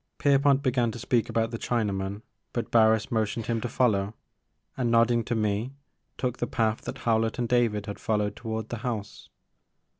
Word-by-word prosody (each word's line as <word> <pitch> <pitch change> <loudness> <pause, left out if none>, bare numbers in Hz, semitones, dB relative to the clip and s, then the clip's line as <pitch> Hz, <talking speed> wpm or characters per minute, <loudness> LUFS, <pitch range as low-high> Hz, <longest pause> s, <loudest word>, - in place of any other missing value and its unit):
Pierpont 140 0 +3
began 125 -3 +2
to 115 - -6
speak 120 0 0
about 115 0 0
the 115 - -4
Chinaman 100 -3 -2 0.3
but 120 - -3
Barris 110 -1 +4
motioned 110 0 -1
him 115 -1 -1
to 120 - -3
follow, 105 -4 +1 0.6
and, 125 -3 0
nodding 115 0 +4
to 120 - -1
me, 110 +4 -1 0.4
took 125 -1 -2
the - - -1
path 110 -2 0
that - - -5
Howlett 115 -1 +2
and 120 -1 -1
David 115 -4 +1
had 100 - -6
followed 105 -2 0
toward 110 -2 -4
the 120 - -3
house. 110 -3 -5
115 Hz, 175 wpm, -27 LUFS, 110-120 Hz, 0.6 s, Barris